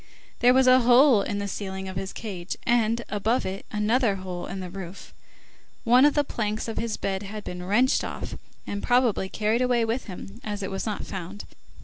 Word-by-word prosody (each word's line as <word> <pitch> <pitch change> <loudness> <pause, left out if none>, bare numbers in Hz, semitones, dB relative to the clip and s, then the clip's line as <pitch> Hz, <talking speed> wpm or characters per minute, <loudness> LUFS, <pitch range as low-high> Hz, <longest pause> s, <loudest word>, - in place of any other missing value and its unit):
There 245 +1 +5
was 265 0 +5
a 255 0 +7
hole 245 -1 +6
in 205 - -3
the 200 0 -2
ceiling 190 -1 -5
of 190 - -6
his 190 +1 -4
cage, 190 -5 -6
and, 235 0 +2
above 215 +4 0
it, 190 +1 -5
another 215 +1 +2
hole 185 -2 -6
in 195 - -5
the 180 -1 -6
roof. 190 0 -9 0.7
One 250 +4 +6
of 295 - +4
the 290 - +3
planks 215 -5 -3
of 225 - -3
his 230 -2 -2
bed 190 -1 -2
had 210 +1 -7
been 180 0 -6
wrenched 225 +8 +2
off, - - -5 0.3
and 200 0 -4
probably 245 -6 +2
carried 220 +4 0
away 245 -2 +2
with 230 +3 -2
him, 195 +3 -9
as 205 -4 -4
it 190 - -4
was 195 +3 -3
not 210 - -3
found. 190 +1 -7
210 Hz, 205 wpm, -26 LUFS, 195-240 Hz, 0.7 s, a